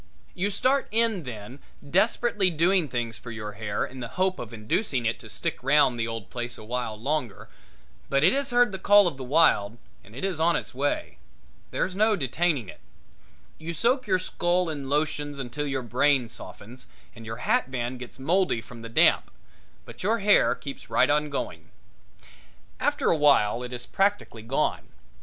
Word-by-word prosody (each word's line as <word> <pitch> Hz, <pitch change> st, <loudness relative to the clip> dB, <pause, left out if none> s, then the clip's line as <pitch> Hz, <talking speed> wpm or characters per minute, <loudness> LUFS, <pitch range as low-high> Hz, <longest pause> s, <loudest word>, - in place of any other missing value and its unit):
You 190 Hz, +3 st, -1 dB
start 260 Hz, +7 st, +1 dB
in 220 Hz, -6 st, +2 dB
then 120 Hz, +2 st, -8 dB, 0.3 s
desperately 205 Hz, +3 st, +2 dB
doing 175 Hz, +1 st, +2 dB
things 120 Hz, -4 st, -3 dB
for 120 Hz, -, -10 dB
your 110 Hz, -2 st, -6 dB
hair 105 Hz, 0 st, -3 dB
in 130 Hz, -, -10 dB
the 120 Hz, -, -4 dB
hope 185 Hz, 0 st, +1 dB
of 115 Hz, -, -7 dB
inducing 120 Hz, -, -1 dB
it 115 Hz, +1 st, 0 dB
to 110 Hz, -3 st, -12 dB
stick -, -, -3 dB
round 135 Hz, -2 st, +3 dB
the 115 Hz, -, 0 dB
old 115 Hz, -3 st, -6 dB
place 120 Hz, 0 st, -4 dB
a -, -, -10 dB
while 115 Hz, -1 st, -4 dB
longer, 135 Hz, -3 st, -3 dB, 0.6 s
but 140 Hz, +1 st, +2 dB
it 180 Hz, -, +6 dB
has 275 Hz, 0 st, 0 dB
heard 245 Hz, -2 st, +4 dB
the 190 Hz, -, -5 dB
call 205 Hz, 0 st, +6 dB
of 165 Hz, -, -3 dB
the 135 Hz, -, -6 dB
wild 125 Hz, -7 st, +3 dB, 0.3 s
and 105 Hz, +3 st, -16 dB
it 135 Hz, -, -3 dB
is 185 Hz, -5 st, -2 dB
on 170 Hz, +1 st, +3 dB
its 120 Hz, -, -4 dB
way. 140 Hz, +3 st, -2 dB, 0.5 s
There's 185 Hz, -, -2 dB
no 215 Hz, +2 st, +3 dB
detaining 145 Hz, -, 0 dB
it. -, -, -11 dB, 0.8 s
You 165 Hz, +1 st, -5 dB
soak 250 Hz, -, +1 dB
your 185 Hz, -2 st, +3 dB
skull 180 Hz, -1 st, 0 dB
in 140 Hz, -3 st, -5 dB
lotions 145 Hz, 0 st, -1 dB
until 135 Hz, +3 st, -4 dB
your 135 Hz, -2 st, -2 dB
brain 125 Hz, +1 st, +2 dB
softens 120 Hz, +2 st, -10 dB, 0.3 s
and 115 Hz, -, -11 dB
your 115 Hz, 0 st, -6 dB
hat -, -, +1 dB
band 125 Hz, -1 st, -3 dB
gets 125 Hz, -, -9 dB
moldy 165 Hz, 0 st, +1 dB
from 115 Hz, 0 st, -12 dB
the 115 Hz, -, -8 dB
damp, 115 Hz, -, +4 dB, 0.6 s
but -, -, -11 dB
your 220 Hz, +5 st, +1 dB
hair 205 Hz, -1 st, +4 dB
keeps 140 Hz, -2 st, -9 dB
right -, -, +3 dB
on 150 Hz, 0 st, +1 dB
going. 140 Hz, -, -5 dB, 1.1 s
After -, -, +1 dB
a -, -, +4 dB
while 135 Hz, -6 st, +4 dB
it 125 Hz, 0 st, -6 dB
is 125 Hz, -1 st, -4 dB
practically 195 Hz, -, 0 dB
gone. 120 Hz, +5 st, -1 dB
140 Hz, 185 wpm, -26 LUFS, 120-185 Hz, 1.1 s, it